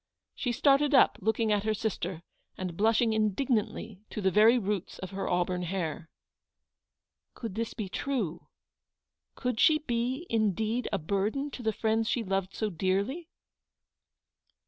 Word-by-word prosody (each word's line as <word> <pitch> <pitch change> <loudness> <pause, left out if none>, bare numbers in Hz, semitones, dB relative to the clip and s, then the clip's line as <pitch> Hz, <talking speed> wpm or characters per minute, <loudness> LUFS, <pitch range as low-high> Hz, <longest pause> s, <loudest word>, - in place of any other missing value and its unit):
She 250 - -2
started 280 +3 +4
up, - - +5
looking 220 +2 +1
at 205 -1 +2
her 215 0 0
sister, 185 -5 -3 0.3
and 185 -2 -4
blushing 225 +3 +3
indignantly 215 -1 0
to - - -5
the 190 -2 +2
very 220 +5 +6
roots 205 -4 -2
of 190 - -7
her 195 0 -3
auburn 180 0 0
hair. 170 -3 -3 1.3
Could 230 -5 -6
this 225 +2 -3
be 215 -5 -3
true? 195 - -3 0.9
Could 250 -3 -2
she 310 - +6
be 255 +1 -2
indeed 220 +1 0
a 200 - +1
burden 205 - -1
to 255 - -7
the 220 -2 +1
friends 220 +1 0
she 240 - 0
loved 195 -1 -2
so 215 -2 -1
dearly 200 - -1
215 Hz, 145 wpm, -29 LUFS, 190-240 Hz, 1.3 s, very